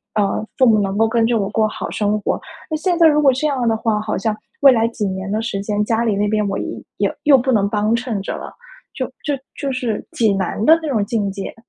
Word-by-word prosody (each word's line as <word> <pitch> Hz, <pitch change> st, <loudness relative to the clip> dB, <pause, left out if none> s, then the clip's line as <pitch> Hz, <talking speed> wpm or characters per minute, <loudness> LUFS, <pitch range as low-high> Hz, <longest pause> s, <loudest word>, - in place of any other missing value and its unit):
呃， 210 Hz, 0 st, 0 dB
父 260 Hz, -, +5 dB
母 220 Hz, -2 st, +5 dB
能 195 Hz, 0 st, -2 dB
够 225 Hz, +1 st, +4 dB
跟 225 Hz, 0 st, +2 dB
着 230 Hz, -1 st, +1 dB
我 195 Hz, -, -1 dB
过 220 Hz, +1 st, +1 dB
好 -, -, -5 dB
生 210 Hz, 0 st, 0 dB
活。 -, -, -1 dB, 0.3 s
那 315 Hz, -, -1 dB
现 340 Hz, +3 st, 0 dB
在 330 Hz, -, +7 dB
如 300 Hz, -1 st, +4 dB
果 280 Hz, -2 st, +5 dB
这 265 Hz, +4 st, -1 dB
样 265 Hz, -4 st, -1 dB
的 225 Hz, -1 st, +2 dB
话， 220 Hz, -1 st, 0 dB
好 215 Hz, 0 st, -2 dB
像 215 Hz, +2 st, -1 dB, 0.2 s
未 275 Hz, -1 st, +8 dB
来 225 Hz, -1 st, +2 dB
几 225 Hz, -2 st, -3 dB
年 190 Hz, 0 st, -4 dB
的 215 Hz, +1 st, 0 dB
时 225 Hz, -4 st, -3 dB
间， 210 Hz, +1 st, -1 dB
家 225 Hz, +1 st, +1 dB
里 220 Hz, -3 st, +1 dB
那 205 Hz, +1 st, +1 dB
边 210 Hz, 0 st, 0 dB
我 195 Hz, -, -2 dB
也 -, -, -3 dB, 0.3 s
也 -, -, 0 dB
又 290 Hz, -3 st, +6 dB
不 260 Hz, +1 st, 0 dB
能 200 Hz, -3 st, +2 dB
帮 210 Hz, +2 st, +1 dB
衬 235 Hz, -4 st, -3 dB
着 -, -, -4 dB
了， -, -, -8 dB, 0.4 s
就 -, -, -3 dB, 0.2 s
就 285 Hz, -3 st, -2 dB
就 280 Hz, -2 st, -3 dB
是 245 Hz, -5 st, -3 dB
挺 220 Hz, -4 st, +2 dB
难 190 Hz, +2 st, -2 dB
的 320 Hz, +1 st, +7 dB
那 315 Hz, -, -4 dB
种 225 Hz, -7 st, +1 dB
境 210 Hz, -3 st, -1 dB
界。 195 Hz, 0 st, -6 dB
225 Hz, 280 characters per minute, -19 LUFS, 205-255 Hz, 0.4 s, 未